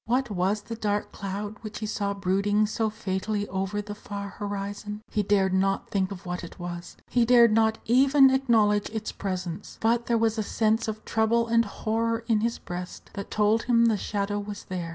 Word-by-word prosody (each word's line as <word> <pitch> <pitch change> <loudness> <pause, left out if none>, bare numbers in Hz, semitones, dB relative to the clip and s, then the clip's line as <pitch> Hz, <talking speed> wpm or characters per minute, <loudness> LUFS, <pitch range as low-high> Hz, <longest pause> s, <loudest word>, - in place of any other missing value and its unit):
What 250 0 +1
was 200 +2 0
the 230 - -6
dark 205 -2 -1
cloud 205 +2 -5
which 215 -2 -7
he 215 - -4
saw 200 -1 -2
brooding 200 +2 +2
so 220 +1 -1
fatally 205 0 -2
over 195 +2 -2
the 205 0 -6
far 200 -1 -6
horizon? 205 +1 -5
He 215 - +1
dared 195 -2 +2
not 195 +1 0
think 190 -1 0
of 195 -1 -8
what 180 0 -4
it 170 - -9
was 175 -1 -7
he 245 - +2
dared 235 -1 +6
not 220 0 +3
even 270 +3 +6
acknowledge 225 -6 +3
its 220 -1 -4
presence; 185 -1 -5
but 235 +1 +1
there 235 - +3
was 225 0 +1
a - - +2
sense 220 +2 +1
of 220 0 -5
trouble 230 +1 +2
and 230 0 +3
horror 225 +2 -1
in 225 -3 +3
his 230 +1 0
breast 180 0 -7
that 200 - -6
told 215 +2 +2
him 235 -1 +5
the 225 -2 +4
shadow 205 0 -2
was 205 -1 -6
there. 180 -2 -3
210 Hz, 195 wpm, -26 LUFS, 200-225 Hz, -, dared